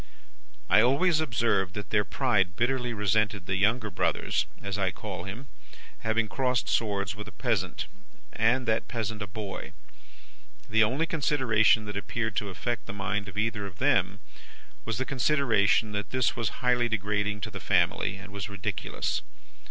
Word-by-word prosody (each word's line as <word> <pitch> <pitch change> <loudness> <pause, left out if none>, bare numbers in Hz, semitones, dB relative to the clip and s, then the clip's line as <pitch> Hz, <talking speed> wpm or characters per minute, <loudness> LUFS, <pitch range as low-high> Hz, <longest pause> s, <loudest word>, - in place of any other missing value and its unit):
"I 95 +4 +6
always 150 +7 +3
observed 115 -9 +1
that 105 -3 -6
their 105 -1 +4
pride 100 -5 +1
bitterly 125 +2 0
resented 105 -1 +1
the 95 - -1
younger 105 +2 +2
brother's - - 0
(as 100 -1 -4
I 100 -2 +1
call 90 - -6
him) 110 +8 -7 0.5
having 110 0 +1
crossed 125 +2 0
swords 100 -3 0
with 105 0 -8
a - - -8
peasant, - - -1 0.5
and 120 +3 +2
that 110 0 +1
peasant 110 -2 -3
a 105 - -3
boy. 100 0 -6 0.9
The 110 0 +4
only 130 +9 +1
consideration 130 -9 +3
that 105 -1 -6
appeared 110 +1 -2
to 100 - -1
affect 115 +3 -3
the - - -5
mind 100 +1 -2
of 95 +1 -9
either 105 -2 -1
of 90 -2 -12
them 100 -8 +2 0.7
was 115 -2 -2
the 130 - -1
consideration 125 -7 +2
that 105 0 -3
this 130 -2 +1
was 115 -4 0 0.2
highly 120 -1 +3
degrading 105 -1 -1
to - - -4
the - - -6
family, 100 - +2
and 100 +1 -10
was 100 -2 -5
ridiculous. 100 -3 -2
110 Hz, 160 wpm, -28 LUFS, 100-120 Hz, 0.9 s, I